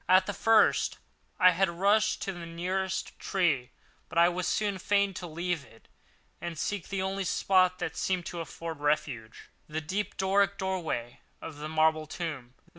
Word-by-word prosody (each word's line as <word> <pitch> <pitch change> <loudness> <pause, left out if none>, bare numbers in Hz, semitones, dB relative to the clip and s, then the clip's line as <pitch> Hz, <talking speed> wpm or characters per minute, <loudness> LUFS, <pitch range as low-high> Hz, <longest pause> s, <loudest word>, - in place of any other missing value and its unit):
At 185 +1 +6
the 205 - -3
first 225 0 +3 0.4
I 185 -1 +8
had 185 +1 +2
rushed 200 +5 +2
to 195 - -3
the 175 -2 -8
nearest 185 +3 -3
tree; 150 -10 +1 0.4
but - - -6
I 170 +1 +7
was 180 0 -2
soon 205 -3 0
fain 200 0 +2
to 180 -1 -6
leave 170 -1 -2
it 115 -4 -19 0.5
and 170 -2 -5
seek 200 +4 -2
the 195 -1 -2
only 195 +1 -2
spot 185 0 +3
that 175 -4 -4
seemed 185 -2 -1
to 175 - -5
afford 165 0 -6
refuge, 145 -6 -2 0.2
the 155 +1 -2
deep 190 +6 -3
Doric 200 +1 +2
doorway 175 -11 -3 0.2
of 160 -3 -8
the 150 +1 -5
marble 155 0 +2
tomb. 150 -8 -5
175 Hz, 170 wpm, -29 LUFS, 155-190 Hz, 0.5 s, I